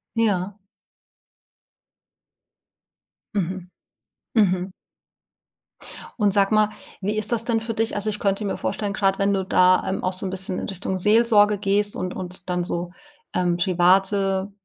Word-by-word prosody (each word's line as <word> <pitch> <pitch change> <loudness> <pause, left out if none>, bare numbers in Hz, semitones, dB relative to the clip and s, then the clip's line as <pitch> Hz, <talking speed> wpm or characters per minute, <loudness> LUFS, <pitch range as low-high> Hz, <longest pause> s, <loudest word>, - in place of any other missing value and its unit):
Ja. 205 -3 0 2.8
Mhm. 185 -2 -3 0.7
Mhm. 185 -3 +2 1.5
Und 205 -2 +3
sag 200 0 +3
mal, 215 -1 +4 0.3
wie 205 +2 -2
ist 215 0 -1
das 230 -1 +1
denn 235 -2 +1
für 225 0 -4
dich? 225 +1 0
Also, 205 +1 -1
ich 210 0 -4
könnte 195 +1 0
mir 200 - -2
vorstellen, 205 -2 -3
grad' 195 -1 +1
wenn 200 0 +2
du 190 -1 -1
da, 185 0 +4
ähm, 190 - -2
auch 185 - 0
so 185 +2 -2
'n 185 - -3
bisschen 190 0 -3
in - - -5
Richtung 190 0 -3
Seelsorge 210 0 +4
gehst 205 +1 +1
und 185 0 -4
und 185 0 -8
dann 180 0 0
so, 175 0 -4 0.4
ähm, 175 -1 +1
private, 190 +2 +2
195 Hz, 145 wpm, -23 LUFS, 185-210 Hz, 2.8 s, mal